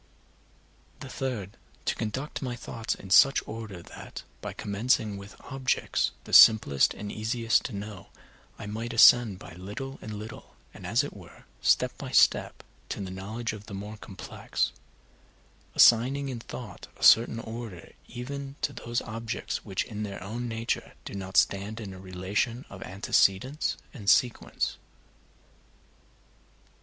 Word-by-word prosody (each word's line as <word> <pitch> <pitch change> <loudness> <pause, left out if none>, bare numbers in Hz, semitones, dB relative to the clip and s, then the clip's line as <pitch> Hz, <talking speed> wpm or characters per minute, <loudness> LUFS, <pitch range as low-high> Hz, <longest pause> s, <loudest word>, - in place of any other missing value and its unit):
The 130 - -7
third, 120 -8 -4 0.3
to - - +2
conduct 130 +7 -4
my 125 -3 -3
thoughts 115 -1 -4
in 95 - -11
such 135 +7 +6
order 110 -6 -7
that, - - -9 0.2
by - - -4
commencing 105 0 0
with 100 +1 -11
objects 135 -2 0
the - - -11
simplest 110 - +7
and 105 0 -6
easiest 115 +1 +1
to 120 - -4
know, 100 -1 -7 0.5
I - - -7
might 115 +3 -4
ascend 115 -3 +7
by 85 - -11
little 105 +10 -7
and 110 - -7
little, 110 +2 -9 0.2
and, - - -9
as - - +3
it - - -7
were, - - -14 0.2
step - - +3
by - - -5
step, - - +3 0.3
to - - -4
the 95 -2 -5
knowledge 110 +5 -4
of 105 -1 -10
the 100 - -7
more 105 +2 -6
complex; 100 -2 -3 1.0
assigning 135 +4 +5
in 125 -3 -4
thought 115 -2 -9
a - - -9
certain 115 0 +7
order 110 -6 -8 0.2
even 140 +3 -6
to 145 -2 0
those 120 -2 -3
objects 115 -1 -4
which - - -2
in 105 - -7
their 100 -3 -5
own 120 +5 -4
nature 115 0 -3
do - - -7
not 95 -1 -4
stand 100 +3 +2
in 100 -4 -7
a 95 - -10
relation 95 +6 -2
of 95 - -9
antecedence 100 +7 +1 0.2
and 105 -8 -2
sequence. 125 -1 +2
110 Hz, 150 wpm, -28 LUFS, 100-120 Hz, 1.0 s, simplest